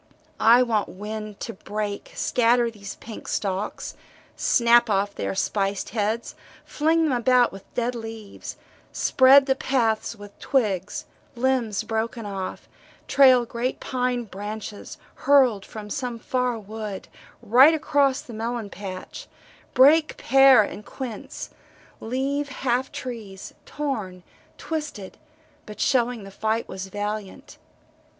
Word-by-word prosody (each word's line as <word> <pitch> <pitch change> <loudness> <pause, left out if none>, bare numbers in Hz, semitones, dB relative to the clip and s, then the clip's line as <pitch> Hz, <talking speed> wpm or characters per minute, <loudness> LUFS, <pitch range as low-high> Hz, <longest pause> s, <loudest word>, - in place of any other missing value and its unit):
I 235 +3 +6
want 220 -4 0
wind 210 +1 -7
to - - -4
break, 205 +1 -5
scatter 240 0 +2
these 200 -2 -9
pink 225 -1 -10
stalks, 195 0 -3 0.4
snap 235 0 +4
off 200 0 +1
their 95 0 -3
spiced 195 - -1
heads, 220 +1 -2 0.3
fling 320 +2 +1
them 310 - +1
about 250 0 +3
with 195 0 -13
dead 245 0 0
leaves 225 -3 -8 0.3
spread 270 +1 +6
the 270 - +3
paths 235 -5 0
with 205 -1 -13
twigs, 205 -8 -1 0.3
limbs 240 -4 0
broken 225 0 -3
off, 195 -2 -5 0.4
trail 260 -3 +6
great 235 +2 -3
pine 250 -1 -1
branches, 210 0 -7 0.2
hurled 255 -8 +4
from 210 -1 -9
some 250 -3 -3
far 250 +1 -1
wood 215 -2 -7 0.4
right 265 +9 +7
across 285 -3 +2
the 240 - -11
melon 225 -1 -4
patch, 185 -1 -8 0.5
break 300 +5 +5
pear 270 -4 +6
and 205 - -7
quince 240 -1 -7 0.5
leave 275 +5 -2
half 260 -1 -1
trees, 215 -6 -7
torn, 215 -12 -4 0.3
twisted 300 -12 -5 0.5
but 210 - -10
showing 245 -4 +1
the 195 - -10
fight 220 +3 -1
was 190 0 -6
valiant. 205 0 -6
230 Hz, 120 wpm, -24 LUFS, 205-255 Hz, 0.5 s, right